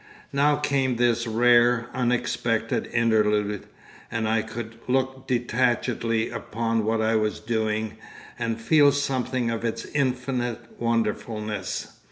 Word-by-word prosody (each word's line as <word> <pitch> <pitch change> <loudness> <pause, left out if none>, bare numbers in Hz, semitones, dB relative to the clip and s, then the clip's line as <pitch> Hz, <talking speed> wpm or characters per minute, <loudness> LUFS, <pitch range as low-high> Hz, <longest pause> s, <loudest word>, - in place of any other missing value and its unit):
Now 145 +1 +4
came 140 -3 0
this 120 0 +2
rare, 120 +1 +4
unexpected 120 -2 0
interlude, 105 -3 +1 0.4
and 115 -1 -1
I 110 0 +2
could 115 0 -7
look 130 +1 -1
detachedly 120 -2 0
upon 115 0 -1
what 110 0 +1
I 110 +1 +2
was 110 -1 0
doing 110 -1 -1 0.4
and 115 -1 -2
feel 145 +4 +5
something 130 -3 -1
of 115 0 -3
its 115 -1 -2
infinite 125 -3 -1 0.2
wonderfulness. 110 -3 -2
115 Hz, 115 wpm, -25 LUFS, 110-125 Hz, 0.4 s, feel